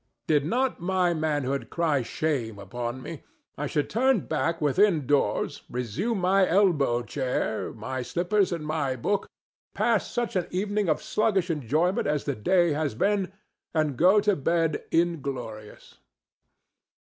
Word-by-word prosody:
Did 145 Hz, -2 st, +2 dB
not 255 Hz, +7 st, 0 dB
my 180 Hz, 0 st, +1 dB
manhood 145 Hz, -4 st, -1 dB
cry 155 Hz, -5 st, +1 dB
shame 120 Hz, -4 st, -2 dB
upon 120 Hz, +5 st, -5 dB
me, 160 Hz, -2 st, -7 dB, 0.3 s
I 150 Hz, -, -3 dB
should 150 Hz, 0 st, -1 dB
turn 255 Hz, -2 st, +2 dB
back 165 Hz, +2 st, -1 dB
within 155 Hz, +1 st, +3 dB
doors, 145 Hz, +2 st, 0 dB
resume 125 Hz, -, -2 dB
my 190 Hz, +1 st, +4 dB
elbow 155 Hz, -11 st, +3 dB
chair, 125 Hz, -4 st, -2 dB
my 130 Hz, +4 st, -5 dB
slippers 180 Hz, -, 0 dB
and 165 Hz, -3 st, -3 dB
my 150 Hz, -4 st, -1 dB
book, 195 Hz, -, -1 dB, 0.5 s
pass -, -, +1 dB
such 240 Hz, -3 st, -2 dB
an 180 Hz, -2 st, 0 dB
evening 205 Hz, +1 st, -1 dB
of 155 Hz, -, 0 dB
sluggish 195 Hz, -5 st, +1 dB
enjoyment 155 Hz, -, 0 dB
as 150 Hz, -1 st, 0 dB
the 140 Hz, -, -1 dB
day 175 Hz, -, +2 dB
has 145 Hz, -5 st, -1 dB
been, 195 Hz, -, +1 dB, 0.4 s
and 155 Hz, -3 st, +1 dB
go 185 Hz, -, +5 dB
to 205 Hz, -1 st, +2 dB
bed 165 Hz, +1 st, 0 dB
inglorious. 135 Hz, -10 st, -3 dB
160 Hz, 140 wpm, -26 LUFS, 135-185 Hz, 0.5 s, go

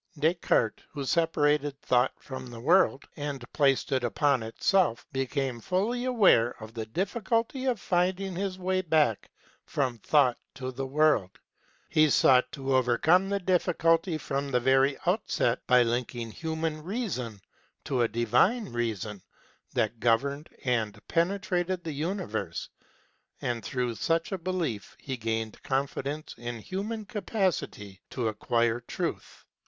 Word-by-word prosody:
Descartes, 155 Hz, -, +1 dB
who 140 Hz, -2 st, -5 dB
separated 145 Hz, -3 st, +1 dB
Thought 125 Hz, -1 st, +2 dB
from 130 Hz, -1 st, -8 dB
the 120 Hz, -1 st, -9 dB
World 155 Hz, +1 st, +3 dB
and 145 Hz, -3 st, -4 dB
placed 140 Hz, -3 st, +2 dB
it 130 Hz, -2 st, +1 dB
upon 130 Hz, +3 st, +2 dB
itself, 115 Hz, -, +1 dB
became 135 Hz, -2 st, -1 dB
fully 210 Hz, -, -1 dB
aware 195 Hz, -, +4 dB
of 110 Hz, 0 st, -10 dB
the 110 Hz, -2 st, -5 dB
difficulty 230 Hz, -, -1 dB
of 250 Hz, -5 st, +1 dB
finding 185 Hz, +1 st, 0 dB
his 190 Hz, 0 st, -2 dB
way 185 Hz, 0 st, 0 dB
back 155 Hz, -, +1 dB, 0.3 s
from 130 Hz, -5 st, -2 dB
Thought 130 Hz, +1 st, +3 dB, 0.2 s
to 130 Hz, -1 st, -4 dB
the 135 Hz, +1 st, -4 dB
World. 135 Hz, -10 st, +2 dB, 0.5 s
He 155 Hz, 0 st, +4 dB
sought 125 Hz, -2 st, +5 dB
to 135 Hz, -1 st, -1 dB
overcome 150 Hz, +10 st, +3 dB
the 200 Hz, -, +1 dB
difficulty 170 Hz, -2 st, +2 dB
from 140 Hz, -1 st, -3 dB
the 125 Hz, -2 st, +2 dB
very 135 Hz, +2 st, +3 dB
outset 175 Hz, -, +1 dB
by 125 Hz, -1 st, +6 dB
linking 120 Hz, -1 st, -2 dB
human 160 Hz, +2 st, -3 dB
reason 165 Hz, -, -3 dB, 0.4 s
to 130 Hz, -3 st, 0 dB
a 120 Hz, -, +4 dB
Divine 125 Hz, -, +2 dB
Reason 110 Hz, -4 st, -3 dB, 0.5 s
that 110 Hz, +1 st, 0 dB
governed 140 Hz, +6 st, +1 dB, 0.2 s
and 115 Hz, -5 st, 0 dB
penetrated 180 Hz, 0 st, 0 dB
the 160 Hz, -3 st, -4 dB
universe; 160 Hz, -, -3 dB, 0.7 s
and 120 Hz, -3 st, -2 dB
through 125 Hz, +2 st, -2 dB
such 165 Hz, +8 st, 0 dB
a 190 Hz, -, -2 dB
belief 165 Hz, -, -3 dB
he 135 Hz, -, -4 dB
gained 110 Hz, -2 st, -3 dB
confidence 140 Hz, +2 st, -2 dB
in 120 Hz, 0 st, -5 dB
human 205 Hz, -, -4 dB
capacity 190 Hz, -, -2 dB
to 120 Hz, -3 st, -2 dB
acquire 120 Hz, +2 st, +1 dB
truth. 120 Hz, -, -5 dB
140 Hz, 135 wpm, -28 LUFS, 120-180 Hz, 0.7 s, by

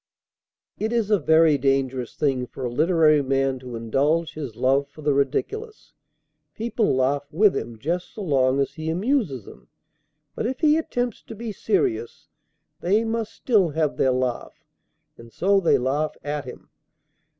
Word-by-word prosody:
It 220 Hz, +1 st, -1 dB
is 230 Hz, -3 st, 0 dB
a 210 Hz, -, +4 dB
very 160 Hz, -1 st, +4 dB
dangerous 130 Hz, -2 st, 0 dB
thing 130 Hz, -4 st, 0 dB
for 130 Hz, -, -7 dB
a 120 Hz, -, -2 dB
literary 155 Hz, +1 st, +4 dB
man 135 Hz, -1 st, 0 dB
to 125 Hz, -1 st, -8 dB
indulge 140 Hz, +9 st, 0 dB
his 140 Hz, -8 st, -6 dB
love 135 Hz, +3 st, +2 dB
for 145 Hz, +2 st, -14 dB
the 145 Hz, -1 st, +2 dB
ridiculous. 425 Hz, -, -2 dB, 0.6 s
People 225 Hz, -, 0 dB
laugh 140 Hz, +3 st, 0 dB
with 195 Hz, +5 st, +4 dB
him 115 Hz, -1 st, -4 dB
just 175 Hz, -, -3 dB
so 215 Hz, -, -5 dB
long 135 Hz, -5 st, +2 dB
as 140 Hz, -, 0 dB
he 160 Hz, 0 st, -5 dB
amuses 180 Hz, -, 0 dB
them; -, -, -14 dB, 0.7 s
but -, -, -2 dB
if 260 Hz, +1 st, -4 dB
he 305 Hz, -1 st, +5 dB
attempts 245 Hz, -7 st, -2 dB
to 225 Hz, -, -10 dB
be 225 Hz, +1 st, -5 dB
serious, 400 Hz, -, -1 dB, 0.5 s
they 205 Hz, +6 st, +2 dB
must 225 Hz, -1 st, -2 dB
still 205 Hz, -9 st, +2 dB
have 155 Hz, -1 st, -1 dB
their 130 Hz, -, +3 dB
laugh, 125 Hz, -1 st, -2 dB, 0.5 s
and 115 Hz, 0 st, -13 dB
so 195 Hz, -, +2 dB
they 180 Hz, -, +3 dB
laugh 140 Hz, +5 st, -1 dB
at 145 Hz, -1 st, -3 dB
him. 125 Hz, -, -11 dB
155 Hz, 160 wpm, -24 LUFS, 135-215 Hz, 0.7 s, he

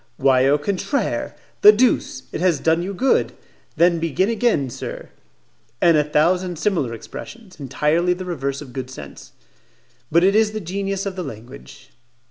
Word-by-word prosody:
"Why 130 Hz, -1 st, +3 dB
au 145 Hz, +2 st, +4 dB
contraire! 200 Hz, -, -2 dB, 0.3 s
The 420 Hz, -, +10 dB
deuce! 245 Hz, -, +1 dB
It -, -, -5 dB
has 175 Hz, -5 st, +2 dB
done 165 Hz, +1 st, +2 dB
you 185 Hz, +3 st, -4 dB
good? 260 Hz, +8 st, +1 dB, 0.4 s
Then 170 Hz, +1 st, +3 dB
begin 165 Hz, -, 0 dB
again, 220 Hz, -, +1 dB
sir." -, -, -7 dB, 0.7 s
And 170 Hz, -2 st, +4 dB
a 150 Hz, -, +4 dB
thousand 175 Hz, +4 st, +1 dB
similar 170 Hz, -, 0 dB
expressions 190 Hz, -, -11 dB
entirely 150 Hz, +6 st, +1 dB
the 185 Hz, +1 st, -7 dB
reverse 140 Hz, -5 st, -3 dB
of 130 Hz, -4 st, -14 dB
good 130 Hz, -2 st, -5 dB
sense. 75 Hz, -, -11 dB, 0.8 s
But 170 Hz, +3 st, +4 dB
it 195 Hz, +2 st, +4 dB
is 215 Hz, -1 st, +3 dB
the 215 Hz, -, -3 dB
genius 195 Hz, +1 st, -3 dB
of 195 Hz, -2 st, -4 dB
the 185 Hz, -, -4 dB
language. 130 Hz, +2 st, -11 dB
170 Hz, 160 wpm, -21 LUFS, 140-195 Hz, 0.8 s, The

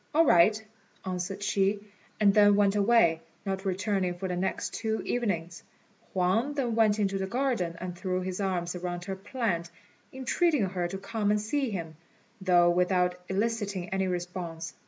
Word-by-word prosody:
"All 330 Hz, +1 st, +6 dB
right," 210 Hz, -, +5 dB, 0.5 s
answered 185 Hz, +2 st, -3 dB
she, 200 Hz, 0 st, +1 dB, 0.4 s
and 205 Hz, -2 st, +5 dB
then 205 Hz, -1 st, +6 dB
went 200 Hz, 0 st, +3 dB
away, 200 Hz, -6 st, +4 dB, 0.2 s
not 195 Hz, 0 st, -3 dB
returning 190 Hz, -1 st, 0 dB
for 190 Hz, -, -3 dB
the 180 Hz, -, -2 dB
next 185 Hz, +2 st, -2 dB
two 220 Hz, -1 st, -2 dB
evenings. 175 Hz, -8 st, -2 dB, 0.5 s
Huang 195 Hz, +10 st, +1 dB
then 250 Hz, -5 st, 0 dB
went 220 Hz, -2 st, +3 dB
into 195 Hz, -2 st, 0 dB
the 190 Hz, -, -2 dB
garden 235 Hz, -7 st, -1 dB
and 180 Hz, -1 st, -5 dB
threw 185 Hz, 0 st, -2 dB
his 185 Hz, +1 st, -4 dB
arms 180 Hz, -2 st, -1 dB
around 175 Hz, 0 st, -4 dB
her 195 Hz, -, -3 dB
plant, 190 Hz, -5 st, -2 dB, 0.4 s
entreating 265 Hz, -, +1 dB
her 180 Hz, -2 st, -2 dB
to 195 Hz, +2 st, -5 dB
come 205 Hz, +2 st, -2 dB
and 210 Hz, 0 st, +3 dB
see 260 Hz, +5 st, -1 dB
him, 165 Hz, -6 st, -5 dB, 0.4 s
though 175 Hz, -2 st, +5 dB
without 180 Hz, 0 st, +2 dB
eliciting 200 Hz, -2 st, -1 dB
any 190 Hz, 0 st, 0 dB
response. 175 Hz, -3 st, -4 dB
190 Hz, 160 wpm, -28 LUFS, 180-210 Hz, 0.5 s, All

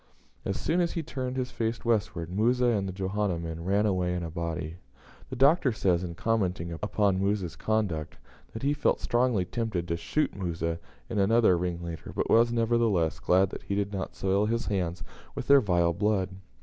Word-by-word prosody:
As 100 Hz, -, -2 dB
soon 175 Hz, +2 st, +1 dB
as 170 Hz, -, 0 dB
he 165 Hz, -, -2 dB
turned 130 Hz, -2 st, -4 dB
his 125 Hz, -1 st, -2 dB
face 115 Hz, 0 st, -3 dB
westward, 95 Hz, -7 st, 0 dB
Musa 120 Hz, +6 st, +2 dB
and 105 Hz, -5 st, +1 dB
the -, -, -3 dB
Johanna 95 Hz, 0 st, -1 dB
men 85 Hz, 0 st, -5 dB
ran 100 Hz, +4 st, +2 dB
away 90 Hz, -3 st, +1 dB
in 90 Hz, -, -3 dB
a 85 Hz, -, -5 dB
body. 85 Hz, -1 st, -4 dB, 0.5 s
The -, -, -5 dB
Doctor 140 Hz, +1 st, +4 dB
says, 90 Hz, -5 st, +1 dB
in 85 Hz, -2 st, -5 dB
commenting 95 Hz, -5 st, -1 dB
upon 100 Hz, +2 st, 0 dB
Musa's 100 Hz, -3 st, -1 dB
conduct, 100 Hz, -9 st, -1 dB, 0.4 s
that 110 Hz, -, -7 dB
he 140 Hz, +1 st, +2 dB
felt 150 Hz, -, +1 dB
strongly 120 Hz, -6 st, +1 dB
tempted 95 Hz, -3 st, -3 dB
to 85 Hz, -, 0 dB
shoot 85 Hz, -, -1 dB
Musa 85 Hz, -3 st, -2 dB, 0.3 s
and 115 Hz, -4 st, -2 dB
another 110 Hz, -1 st, +4 dB
ringleader, 85 Hz, -1 st, -4 dB
but -, -, -1 dB
was, 115 Hz, +1 st, +5 dB
nevertheless, 115 Hz, -8 st, +1 dB
glad 95 Hz, +1 st, +3 dB
that -, -, -7 dB
he 100 Hz, -, -3 dB
did 100 Hz, 0 st, -1 dB
not 95 Hz, -1 st, -4 dB
soil 100 Hz, +2 st, +1 dB
his 115 Hz, +1 st, -1 dB
hands 90 Hz, -4 st, -2 dB, 0.3 s
with -, -, -5 dB
their 140 Hz, -1 st, +7 dB
vile 85 Hz, -5 st, +2 dB
blood. 100 Hz, 0 st, +1 dB
100 Hz, 190 wpm, -28 LUFS, 85-115 Hz, 0.5 s, their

